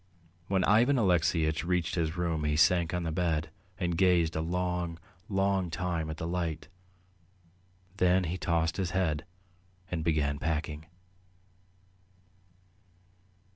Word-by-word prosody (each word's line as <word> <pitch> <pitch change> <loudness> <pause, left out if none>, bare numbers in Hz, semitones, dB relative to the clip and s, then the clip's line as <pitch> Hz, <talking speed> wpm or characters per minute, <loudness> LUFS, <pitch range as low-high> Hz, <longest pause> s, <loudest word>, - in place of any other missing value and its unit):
When 95 -1 +1
Ivan 115 +8 +4
Alexeyitch 85 - +2
reached 90 -1 0
his 85 -1 -1
room 85 -3 -1
he 75 0 +1
sank 85 +1 +3
on 90 -1 -2
the 80 - -2
bed 80 -2 -1 0.3
and 85 -2 -1
gazed 85 -3 +3
a 80 - 0
long, 90 0 -2 0.3
long 95 -2 +1
time 85 -2 -2
at 80 - -5
the 80 - -4
light. 85 -2 -3 1.3
Then 90 0 +3
he 85 +1 -2
tossed 80 -1 0
his 95 -3 -1
head 80 -5 0 0.7
and 85 -3 -2
began 75 -3 0
packing. 80 -1 -3
85 Hz, 125 wpm, -30 LUFS, 80-90 Hz, 1.3 s, Ivan